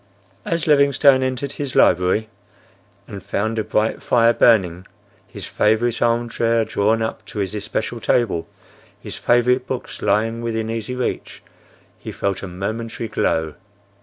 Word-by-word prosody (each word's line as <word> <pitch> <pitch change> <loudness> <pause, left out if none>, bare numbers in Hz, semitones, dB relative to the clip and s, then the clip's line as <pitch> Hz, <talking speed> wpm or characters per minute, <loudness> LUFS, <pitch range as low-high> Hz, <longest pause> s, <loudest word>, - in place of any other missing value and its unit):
As 170 -2 -1
Livingstone 140 -2 +4
entered 130 +1 -2
his 140 -2 -6
library 90 +5 +3 0.8
and 100 - -8
found 110 +2 -2
a - - 0
bright 110 +1 -1
fire 115 -1 +3
burning; 95 -8 +3 0.4
his - - -9
favorite 110 +2 +1
arm 120 0 +1
chair 115 -1 +1
drawn 110 +1 +1
up 110 - -4
to - - -10
his 100 -1 -2
especial 110 +3 -4
table; 110 -7 0 0.5
his - - -8
favorite 125 +1 +2
books 130 -2 -6
lying 110 +3 0
within 115 -1 -3
easy 115 +2 -4
reach, 125 - -4 0.6
he - - -7
felt 100 -1 -2
a 100 - -6
momentary 110 +5 -5
glow. 80 -5 -1
115 Hz, 140 wpm, -20 LUFS, 105-120 Hz, 0.8 s, Livingstone